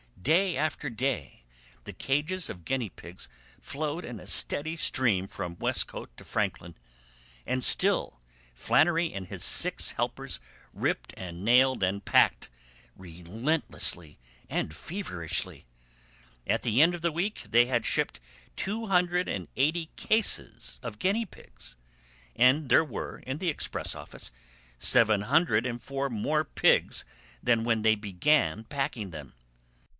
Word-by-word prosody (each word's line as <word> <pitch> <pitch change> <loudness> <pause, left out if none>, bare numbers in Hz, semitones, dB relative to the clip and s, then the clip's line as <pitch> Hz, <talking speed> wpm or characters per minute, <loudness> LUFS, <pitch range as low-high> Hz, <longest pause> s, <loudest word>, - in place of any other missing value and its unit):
Day 170 - +2
after 150 -1 -2
day 110 - -3 0.4
the - - -8
cages 155 +7 -1
of 90 -4 -9
guineapigs 105 -8 -4 0.3
flowed 150 +4 -4
in 120 -4 -7
a - - -13
steady 155 +3 +1
stream 115 - +2
from 85 -2 -6
Westcote - - -1
to - - -12
Franklin, 85 -1 -3 0.7
and 130 0 -1
still - - +6 0.3
Flannery 160 - +2
and 95 -2 -6
his - - -5
six - - +2
helpers - - -3 0.3
ripped - - -2
and 90 -1 -7
nailed 130 +3 +4
and 95 +1 -1
packed - - +3 0.5
relentlessly 90 - -2 0.3
and 80 - -2
feverishly. 90 - -4 0.8
At - - 0
the 120 +3 +3
end 170 +2 +4
of 175 - -6
the 170 0 +1
week 185 +7 -2
they 120 +1 +5
had 120 -1 -1
shipped - - -1 0.4
two 220 +3 -3
hundred 180 -1 +2
and 90 -3 -4
eighty 160 +5 +1
cases 60 - 0
of 105 -2 -7
guinea 210 +5 +1
pigs, - - -13 0.6
and 130 +3 +4
there 160 - +5
were 135 - -6
in 130 +2 -3
the 180 - 0
express 150 - -3
office - - -8 0.5
seven 110 - +4
hundred 130 -2 +2
and 120 -1 -4
four 140 +3 -3
more 150 +8 0
pigs - - +2 0.4
than 115 -2 +2
when 115 -1 +1
they 110 0 +4
began 105 +4 +1
packing 135 -6 -3
them. 75 -6 -10
125 Hz, 135 wpm, -28 LUFS, 100-155 Hz, 0.8 s, still